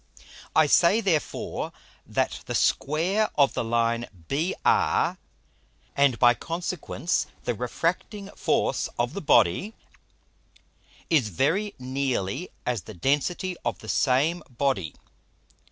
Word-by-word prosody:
I 155 - +6
say 170 +8 +5
therefore, 180 - -1 0.4
that - - -1
the - - -2
Square 180 +9 +1
of 140 -2 +4
the - - -1
Line 115 +1 0 0.2
BR, 160 +7 +1 0.8
and 140 -4 +3
by 120 0 +6
consequence 170 +3 -2 0.2
the 120 - -1
refracting 175 - -3
Force - - 0
of - - 0
the - - -4
Body, 185 - +3 1.4
is 140 -10 +3
very 175 - 0
nearly 130 - -2 0.2
as 120 -5 -1
the 110 - -11
density 150 - 0
of 115 -6 -1
the 110 - -11
same 145 +6 +2
Body. 120 - -1
140 Hz, 110 wpm, -26 LUFS, 120-175 Hz, 1.4 s, I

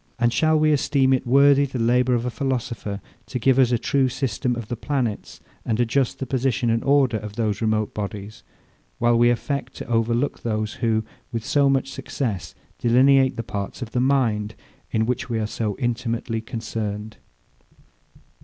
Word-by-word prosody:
And 120 -1 +2
shall 155 +5 +3
we 155 0 +3
esteem 135 -2 +2
it 130 - 0
worthy 140 +2 +5
the 135 -1 -5
labour 125 +2 +2
of 120 0 -1
a 125 - -2
philosopher 120 -7 -3 0.3
to - - -3
give 130 +2 +3
us 125 -2 +4
a 120 - +3
true 130 +3 +1
system 125 -1 -1
of 115 -3 -6
the 120 - -3
planets, 120 -4 -3 0.2
and 115 0 -1
adjust 125 +2 +1
the 135 - -4
position 130 -2 0
and 115 0 0
order 135 -4 +3
of 105 -1 -7
those 105 -3 -1
remote 110 -1 0
bodies; 105 0 -6 0.6
while 120 0 +3
we 120 +1 +5
affect 130 +2 -2
to - - -7
overlook 120 +3 0
those, 110 -2 -2
who, 110 -2 +1 0.3
with 115 -1 -4
so 140 +1 +3
much 135 0 +1
success, 110 -10 -4 0.2
delineate 130 +2 +4
the 115 - -2
parts 100 +3 -5
of 115 - -9
the 125 - 0
mind, 115 -6 +1 0.3
in 110 0 +1
which 125 +1 -2
we 115 - -1
are 110 - -1
so 105 -1 -3
intimately 115 -1 -2
concerned? 110 -2 -5
120 Hz, 175 wpm, -23 LUFS, 110-130 Hz, 0.6 s, worthy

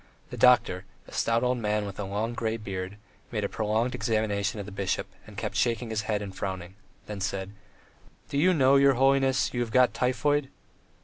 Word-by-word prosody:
The - - -5
doctor, 100 -7 +4 0.2
a - - -13
stout 115 +1 +1
old 125 0 +1
man 105 -1 0
with 100 0 -7
a 100 - -2
long 105 +4 -2
grey 115 -1 -2
beard, 95 -2 -5 0.3
made 105 -3 -2
a - - +1
prolonged 110 +4 0
examination 110 -3 -1
of 100 - -5
the 105 - -9
bishop, 100 -1 -1 0.2
and - - -13
kept - - -4
shaking 115 -1 0
his 110 -1 0
head 105 -1 0
and 95 -2 -8
frowning, 95 -2 -5 0.3
then 105 -2 -6
said: 95 0 -3 0.8
"Do 140 - -1
you 180 +5 +5
know, 140 -5 +5
your 140 0 +6
holiness, 135 +1 +3
you 120 - -2
have 120 - -2
got 125 +2 +4
typhoid?" 135 +2 +1
110 Hz, 195 wpm, -27 LUFS, 100-125 Hz, 0.8 s, your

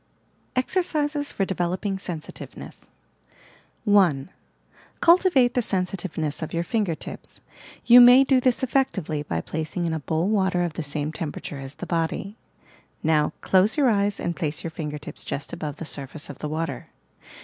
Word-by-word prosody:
EXEKCISES 295 0 0
FOB 195 - -1
DEVELOPING 190 +2 -2
SENSITIVENESS 170 -5 -8 1.0
1. 185 -8 +3 0.7
Cultivate 335 -8 +5
the 250 - +2
sensitiveness 180 -7 -1
of 160 - -4
your 170 - 0
finger 205 -5 0
tips. - - -8 0.5
You 245 +1 +9
may 245 +2 +9
do 265 -1 +3
this 255 0 +1
effectively 195 - 0
by 145 - -3
placing 160 +3 -3
in 165 - -1
a 160 - -2
bowl 160 +4 -1
water 190 -4 +2
of 170 -3 -2
the 165 - -4
same 150 0 -3
temperature 150 -2 -6
as 135 +1 -7
the - - -6
body. 170 +4 -2 0.7
Now, 155 -1 +2
close 190 +6 +3
your 280 -4 +4
eyes 205 -1 +1
and 170 0 -2
place 155 -4 -3
your 165 - -4
finger 150 -2 -5
tips 150 - -9
just 140 - -5
above 155 -4 -4
the 165 - -7
surface 145 +1 -5
of 140 - -14
the 150 - -4
water. 160 +2 -3
175 Hz, 160 wpm, -24 LUFS, 155-220 Hz, 1.0 s, You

